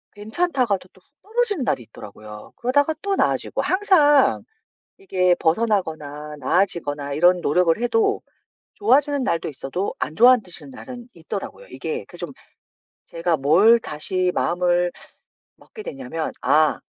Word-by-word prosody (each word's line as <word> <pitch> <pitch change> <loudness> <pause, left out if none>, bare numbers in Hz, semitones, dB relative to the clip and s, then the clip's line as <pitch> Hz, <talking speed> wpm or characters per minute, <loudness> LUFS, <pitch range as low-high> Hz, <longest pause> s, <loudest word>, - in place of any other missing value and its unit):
괜찮다가도 220 - -1
또 190 - -22
훅 285 - -35
떨어지는 425 - -1
날이 125 - -1
있더라고요. 105 -1 -12
그러다가 285 +6 +1
또 400 -1 -1
나아지고. - - 0
항상 315 -8 +3 0.5
이게 185 - +1
벗어나거나 160 -7 -1
나아지거나 145 -3 0
이런 175 +4 +4
노력을 165 +2 +2
해도 225 -2 +1 0.5
좋아지는 290 -8 +2
날도 165 -10 -1
있어도 140 +7 -4
안 155 - -4
좋아하 250 +2 +7
지는 180 +9 -11
날은 250 -2 -10
있더라고요. 200 - -7
이게 460 0 -5
그 - - -13
좀 - - -7 0.7
제가 170 0 -1
뭘 175 +12 +5
다시 180 +2 -2
마음을 175 0 +1 0.7
먹게 435 - -13
됐냐면 135 - -5
'아 155 0 +3
185 Hz, 310 characters per minute, -22 LUFS, -, 0.7 s, 좋아하